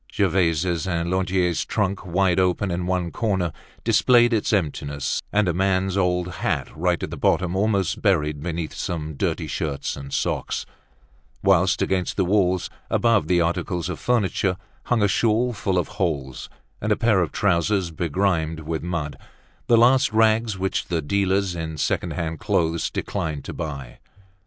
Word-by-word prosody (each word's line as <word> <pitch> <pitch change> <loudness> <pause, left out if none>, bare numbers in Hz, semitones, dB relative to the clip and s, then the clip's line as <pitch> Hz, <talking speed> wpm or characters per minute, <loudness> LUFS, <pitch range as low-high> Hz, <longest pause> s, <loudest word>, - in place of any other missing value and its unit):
Gervaise's 85 -2 +1
and 85 -1 -1
Lantier's 90 -2 +1
trunk, 100 -2 -1
wide 95 0 +1
open, 95 +1 +1
in 90 +1 -2
one 90 -2 -1
corner, 95 -7 0 0.3
displayed 120 +2 +4
its 110 +2 +1
emptiness, 75 -7 -1
and 105 -1 +2
a 85 - +1
man's 95 +1 +1
old 90 -2 +1
hat - - -2
right 85 +2 0
at - - -4
the - - -5
bottom 90 0 +1
almost 100 +1 0
buried 75 -8 +1
beneath 85 -1 -4
some 80 -3 -4
dirty 70 - -1
shirts 70 -3 -3
and 70 -1 -9
socks; - - -2 0.8
whilst, 95 0 +3
against 95 -2 -1
the 95 - +2
walls, 95 -2 +2 0.2
above 115 -9 +2
the 90 0 +3
articles 85 +1 -1
of 90 - -4
furniture, 100 -6 +1 0.3
hung 120 -4 +2
a - - +5
shawl 115 +5 +2
full 95 -3 -1
of 90 - 0
holes, 65 -2 -2 0.3
and 105 - -1
a - - +5
pair 115 -4 +3
of 85 - -1
trousers 95 -1 +1
begrimed 80 0 -1
with 80 +1 -3
mud, 85 -4 -3 0.5
the 120 - +5
last 125 +2 +5
rags 110 -1 +2
which 95 +1 -1
the 85 -3 -2
dealers 95 +2 +1
in 80 -2 -5
second - - -1
hand 80 -3 -3
clothes 80 0 0
declined 75 -3 -3
to - - -6
buy. 70 -6 -6
90 Hz, 160 wpm, -23 LUFS, 80-100 Hz, 0.8 s, a